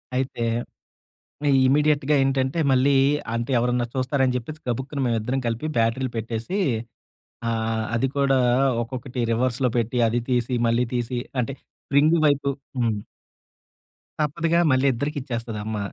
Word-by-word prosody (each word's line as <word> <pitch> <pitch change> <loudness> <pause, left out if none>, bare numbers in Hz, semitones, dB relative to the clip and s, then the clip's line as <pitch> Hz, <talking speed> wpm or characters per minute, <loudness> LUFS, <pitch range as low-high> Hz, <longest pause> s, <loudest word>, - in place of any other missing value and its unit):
అయితే 130 -2 -2 1.0
ఆహ్, 140 -1 +4
ఇమ్మీడియేట్‌గా 150 +1 +3
ఏంటంటే, 135 +3 0
మళ్ళీ 135 +2 +4 0.4
అంటే 115 +3 -2
ఎవరన్నా 125 0 +1
చూస్తారని 130 0 +1
జెప్పేసి 150 +6 -5
గబుక్కున 135 +4 -3
మేమిద్దరం 120 +2 0
కలిపి 115 +6 -2
బ్యాటరీలు 115 +3 +1
పెట్టేసి, 115 - -3 0.9
ఆహ్, 110 -1 -1
అది 130 +3 +1
కూడా 135 -1 +3 0.4
ఒక్కొక్కటి 125 +1 -5
రివర్స్‌లో 125 +1 +1
పెట్టి, 120 +2 -1
అది 120 +1 0
తీసి, 125 +1 +1
మళ్ళీ 120 +2 +2
తీసి, 120 0 -1 0.2
అంటే 125 +3 -4 0.3
స్ప్రింగు 150 +4 +4
వైపు 140 -1 +1 0.3
హ్మ్. 115 -3 +1 1.3
తప్పదుగా 165 +3 +1
మళ్ళీ 130 +1 +3
ఇద్దరికిచ్చేస్తది 120 -5 -4
అమ్మ. 110 -1 -3
130 Hz, 120 wpm, -24 LUFS, 115-140 Hz, 1.3 s, ఆహ్